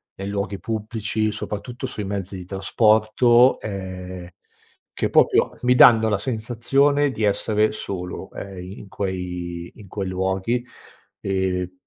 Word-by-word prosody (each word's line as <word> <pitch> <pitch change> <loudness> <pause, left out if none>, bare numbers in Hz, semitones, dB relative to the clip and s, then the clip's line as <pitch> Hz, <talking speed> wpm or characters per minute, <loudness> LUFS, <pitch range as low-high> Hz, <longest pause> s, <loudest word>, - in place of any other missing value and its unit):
nei 95 - -6
luoghi 100 -1 -3
pubblici, 110 -1 -2
soprattutto 120 +5 -5
sui 110 -5 -5
mezzi 95 -1 -4
di 90 - -8
trasporto, 110 +5 +4
ehm, 95 -3 -6 0.6
che - - -1
proprio - - +3
mi 125 0 +3
danno 110 -3 +7
la 105 - +1
sensazione 130 +6 +1
di 110 - -4
essere 105 +1 +2
solo, 90 -4 -6
ehm, 100 -1 -8
i 90 +3 -9
in 100 - -12
quei 90 -3 -4
in 105 - -13
quei 95 +1 -4
luoghi. 95 +6 -1 0.6
E 95 -1 -1
100 Hz, 130 wpm, -23 LUFS, 95-110 Hz, 0.6 s, danno